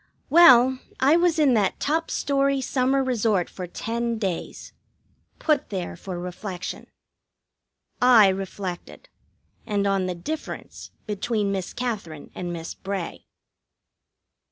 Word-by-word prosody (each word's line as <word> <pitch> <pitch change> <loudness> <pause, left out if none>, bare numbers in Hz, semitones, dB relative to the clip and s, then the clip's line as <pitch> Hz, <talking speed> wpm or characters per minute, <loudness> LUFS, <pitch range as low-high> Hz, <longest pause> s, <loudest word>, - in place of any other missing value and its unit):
Well, 260 -6 +7 0.2
I 280 +4 +5
was 345 -1 +3
in 290 -5 +4
that 210 -4 +1
top 320 +3 0
story 275 -1 +1
summer 265 +1 +1
resort 225 -7 0
for 180 -1 -6
ten 235 +5 -3
days. 190 -6 -4 0.6
Put 300 -4 0
there 185 -4 -4
for 180 +1 -7
reflection. 180 +1 -6 1.1
I 240 -5 +7
reflected. 190 - -5 0.5
And 205 -2 -1
on 195 -2 +1
the 180 - -3
difference 310 - -7 0.2
between 210 0 -1
Miss 190 -2 -3
Katherine 200 - -5
and 175 -1 -5
Miss 165 -1 -6
Bray. 195 -3 -6
215 Hz, 115 wpm, -24 LUFS, 185-265 Hz, 1.1 s, Well